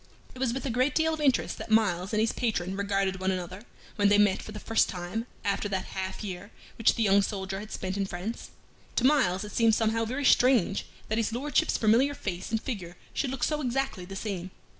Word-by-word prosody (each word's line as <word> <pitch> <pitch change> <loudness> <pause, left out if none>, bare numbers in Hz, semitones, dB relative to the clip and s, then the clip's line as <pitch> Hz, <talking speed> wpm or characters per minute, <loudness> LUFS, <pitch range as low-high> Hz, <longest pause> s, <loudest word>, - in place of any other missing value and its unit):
It 255 - -11
was 260 -3 +1
with 265 +4 -4
a 265 - -1
great 255 +4 +1
deal 320 0 +2
of 315 - -4
interest 275 -3 +1
that - - -7
Myles 200 -4 +2
and 215 - +1
his 220 +1 +2
patron 190 -6 -1
regarded 195 -1 0
one 190 0 0
another 185 +1 -3 0.4
when 205 -1 +4
they 205 - +5
met 205 -2 +3
for - - -9
the 210 - -7
first 225 +1 +2
time 185 +6 -4 0.2
after 200 +1 0
that 190 -2 -2
half 190 +2 -4
year 195 0 -6 0.3
which 225 - +4
the 230 - +1
young 200 -1 +5
soldier 195 -1 -3
had 215 +1 -9
spent 190 +1 -3
in 195 -1 0
France. 190 +6 -5 0.5
To - - +1
Myles 245 -10 +3
it 210 - -7
seemed 225 0 +4
somehow 225 0 +1
very 260 +5 -2
strange 245 -7 +4 0.2
that 220 +1 0
his 225 - 0
Lordship's 265 +4 +1
familiar 240 +6 +3
face 190 -7 -4
and 225 - 0
figure 185 -9 -6 0.2
should 275 - -1
look 255 -1 -4
so 300 -1 +1
exactly 265 -6 -1
the 195 +2 -8
same. 190 -3 -4
210 Hz, 225 wpm, -28 LUFS, 190-245 Hz, 0.5 s, they